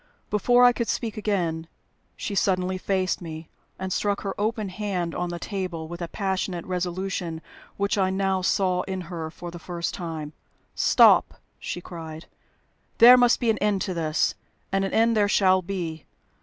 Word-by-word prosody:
Before 245 +4 +4
I 245 - +8
could 235 -1 -2
speak 225 -3 -2
again, 175 -6 -1 0.5
she 205 - -5
suddenly 185 -1 +1
faced 185 -1 0
me, 160 -1 -8 0.3
and 190 -1 -3
struck 200 +1 0
her 195 -1 -3
open 215 -1 -1
hand 185 -3 -3
on 180 0 -2
the 175 - -4
table 180 -4 -4
with 175 +2 -8
a 170 - -2
passionate 190 -2 -2
resolution 180 -2 -3 0.4
which 200 +1 0
I 190 -1 +3
now 190 0 0
saw 185 -1 +1
in 190 -1 -3
her 165 -2 -6
for 175 +2 -9
the 170 - -9
first 170 0 -4
time. 160 -4 -5 0.4
"Stop!" - - +5 0.2
she 175 - -5
cried. 160 -2 -8 0.7
"There 240 +2 +10
must 245 -1 +4
be 235 -2 +2
an 215 - -3
end 205 -2 +1
to 185 - -3
this. 160 -2 0 0.4
And 195 0 +1
an 195 - -2
end 230 +1 +3
there 205 -1 +3
shall 185 -2 +4
be. 170 -5 -5
185 Hz, 170 wpm, -25 LUFS, 170-200 Hz, 0.7 s, There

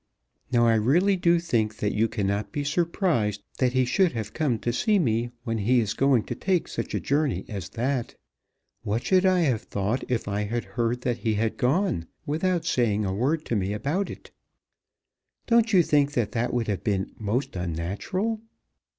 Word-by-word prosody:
Now 120 -1 +4
I 115 - +5
really 155 - +3
do 170 -1 +3
think 110 -10 0
that 105 - -1
you 110 +2 +2
cannot 100 -2 -2
be 145 - -2
surprised 145 - 0 0.2
that 125 -2 +2
he 130 -1 +3
should 165 +7 +2
have 110 -3 -4
come 145 -7 0
to 120 +2 -2
see 210 - +2
me 120 - +1
when 115 -3 -2
he 120 +5 +3
is 110 -3 0
going 135 -5 +3
to - - -4
take 185 -3 0
such - - -4
a - - +1
journey 140 - 0
as 100 -5 -6
that. 125 0 -1 0.7
What 110 +3 -2
should 190 0 +3
I 185 -1 +3
have 130 -9 +1
thought 100 +6 -2
if 120 -4 -1
I 105 +1 -1
had 115 +3 -2
heard 120 0 -2
that 120 -2 -1
he 110 -2 0
had 110 +1 0
gone 135 - 0 0.2
without 165 +3 0
saying 110 -8 +1
a 95 - -1
word 145 +10 0
to 120 - -1
me 100 -1 0
about 150 - -1
it? - - -10 1.1
Don't 230 -1 +3
you 185 -4 +6
think 145 -2 +2
that 120 -6 0
that 120 0 -1
would 120 -2 -1
have 100 -3 -2
been 95 -3 -1
most 110 +4 -2
unnatural? 95 - -2
120 Hz, 190 wpm, -26 LUFS, 105-155 Hz, 1.1 s, you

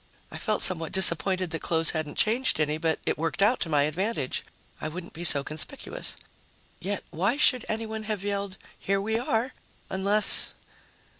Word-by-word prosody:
I - - -7
felt 215 -2 0
somewhat 165 -4 +2
disappointed 185 0 +4
that 165 - -3
clothes 165 -1 +1
hadn't 155 -3 -4
changed 235 +1 +2
any, 155 0 0
but 160 -1 0
it - - -1
worked 165 +4 0
out 230 +5 +3
to 165 - -3
my 145 -2 +3
advantage; 155 - -2 0.4
I - - -3
wouldn't 170 +3 -8
be 170 - -7
so 145 -5 +3
conspicuous. 155 - -2 0.6
Yet 195 +2 -3
why 195 - 0
should 255 -4 +3
anyone 220 0 -4
have 210 -3 -3
yelled 200 -1 -3 0.2
"Here 195 0 0
we 220 +3 -1
are!" 245 +1 -1 0.4
unless.... 200 +2 +4
190 Hz, 165 wpm, -27 LUFS, 160-215 Hz, 0.6 s, disappointed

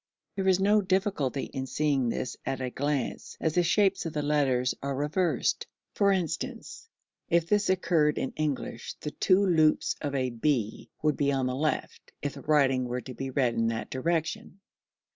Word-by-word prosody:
There 195 -1 -1
is 190 -1 +4
no 205 +2 +4
difficulty 185 -8 0
in 135 -1 -5
seeing 140 -3 +1
this 125 - -3
at 135 0 -2
a 130 -1 -3
glance, 140 -2 -2
as 160 - 0
the 180 - +3
shapes 195 +3 +2
of 160 - -6
the 150 -2 -1
letters 135 -4 +2
are 140 0 -2
reversed; 150 +2 0 0.3
for 200 -1 +3
instance, 190 - -3 0.4
if 170 -1 +3
this 205 +2 +2
occurred 165 -5 +2
in - - -2
English 145 -6 -3
the 150 - -6
two 195 +5 +3
loops 160 -4 +3
of 145 -2 -2
a 130 -2 0
B 115 -3 -1
would 150 -1 +2
be 140 -1 +2
on 135 -2 0
the 125 0 -1
left, 155 +3 -3
if 145 - -2
the - - -9
writing 135 -4 +3
were 125 +1 -3
to 130 - -8
be 135 +2 -5
read 125 -3 +1
in 115 0 +1
that 115 -1 -3
direction, 160 +4 -1
[Symbol: - - -15
reverse - - -30 0.4
B]. - - -66
145 Hz, 195 wpm, -28 LUFS, 130-170 Hz, 0.4 s, is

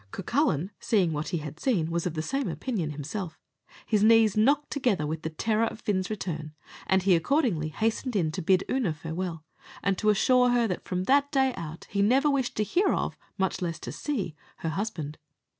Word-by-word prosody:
Cucullin, 195 - 0
seeing 185 -7 +2
what 150 +1 -3
he 175 - -1
had 155 0 -7
seen, 175 -11 +1
was 170 +1 0
of 165 - -4
the 155 - -2
same 275 +8 -1
opinion 205 - -2
himself; 155 +5 -5 0.5
his 210 -2 +2
knees 225 -1 +6
knocked 280 +7 +3
together 240 - +1
with 155 +1 -3
the 160 - -3
terror 220 +7 +1
of 225 - -5
Fin's 190 -3 -1
return, 160 -7 -4 0.3
and 190 -1 +3
he 190 -2 +5
accordingly 185 - +1
hastened 225 - -1
in 165 -6 +1
to 185 - -4
bid 185 +2 +3
Oonagh 230 -12 0
farewell, 165 +1 -5 0.4
and 195 -2 +1
to 215 - +2
assure 250 +4 +4
her, 240 -1 +3
that 180 - -4
from 180 0 -2
that 280 +6 +3
day 265 -3 +2
out, 165 -4 -7
he 200 - +1
never 265 +8 +4
wished 265 -3 -1
to 215 - +2
hear 360 - +2
of, - - -1 0.2
much 190 -1 -1
less 170 -2 -2
to - - -5
see, 205 - -3 0.2
her 165 - -3
husband. 160 -5 -4
195 Hz, 200 wpm, -27 LUFS, 165-240 Hz, 0.5 s, knees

